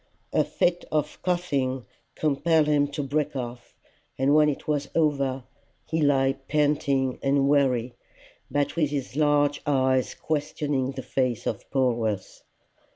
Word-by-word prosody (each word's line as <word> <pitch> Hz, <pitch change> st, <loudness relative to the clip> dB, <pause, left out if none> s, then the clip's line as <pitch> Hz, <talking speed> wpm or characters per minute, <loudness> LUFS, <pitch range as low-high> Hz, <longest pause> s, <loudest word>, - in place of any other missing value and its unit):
A -, -, +4 dB
fit 175 Hz, 0 st, 0 dB
of 150 Hz, -1 st, -1 dB
coughing 140 Hz, -8 st, -1 dB, 0.3 s
compelled 155 Hz, +1 st, +2 dB
him 145 Hz, -1 st, +2 dB
to 145 Hz, 0 st, -4 dB
break 145 Hz, +1 st, -1 dB
off, 120 Hz, -2 st, -6 dB, 0.4 s
and 135 Hz, +2 st, +3 dB
when 150 Hz, 0 st, +5 dB
it 145 Hz, -, -5 dB
was 145 Hz, -2 st, -1 dB
over, 140 Hz, -5 st, +1 dB, 0.4 s
he 160 Hz, 0 st, -1 dB
lay 135 Hz, -2 st, +3 dB
panting 140 Hz, -3 st, +1 dB
and 140 Hz, 0 st, +2 dB
weary, 130 Hz, -4 st, +2 dB, 0.6 s
but 145 Hz, +1 st, 0 dB
with 155 Hz, -4 st, +1 dB
his 140 Hz, -3 st, -4 dB
large 145 Hz, -1 st, +2 dB
eyes 130 Hz, -2 st, +2 dB
questioning 145 Hz, -3 st, -2 dB
the 130 Hz, -1 st, -6 dB
face 125 Hz, -4 st, -1 dB
of -, -, -4 dB
Polwarth. 115 Hz, -7 st, -1 dB
140 Hz, 135 wpm, -26 LUFS, 130-150 Hz, 0.6 s, when